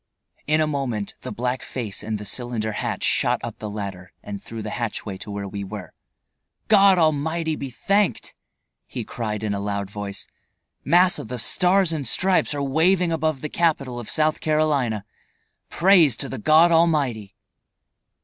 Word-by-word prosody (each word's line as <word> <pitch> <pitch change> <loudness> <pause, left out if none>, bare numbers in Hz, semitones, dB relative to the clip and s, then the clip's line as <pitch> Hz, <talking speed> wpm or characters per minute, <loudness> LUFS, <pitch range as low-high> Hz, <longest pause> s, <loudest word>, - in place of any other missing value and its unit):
In 155 +1 +3
a - - +3
moment 135 -9 -3
the - - -6
black 125 +3 -2
face 115 -6 -4
and 110 0 -3
the 105 - -8
cylinder 115 0 -2
hat - - -3
shot - - +2
up - - -6
the 105 - -5
ladder 100 -3 -6
and 100 -1 -7
through 115 -1 -7
the 105 - -5
hatch 120 -2 -4
way 100 -3 -5
to - - -9
where 100 -1 -4
we 100 +1 -5
were. 105 +2 -8 0.8
"God 200 -3 +6
Almighty 160 0 +1
be 140 -2 -5
thanked!" 195 - 0 0.5
he - - -5
cried 110 -3 -4
in 105 -2 -1
a 100 - -2
loud 100 -1 -3
voice. 100 -1 -5 0.6
"Massa, 180 +2 +4
the 125 +3 -6
Stars 180 - +2
and 150 -5 -2
Stripes 185 +3 +2
are 140 - -2
waving 170 +5 +2
above 155 -3 -1
the 150 - -3
capital 140 -8 0
of 120 - -8
South 155 0 +1
Carolina. 145 -9 0 0.6
Praise 170 - +4
to - - -4
the - - -6
God 160 +8 +5
Almighty!" 145 - +1
130 Hz, 170 wpm, -23 LUFS, 105-160 Hz, 0.8 s, God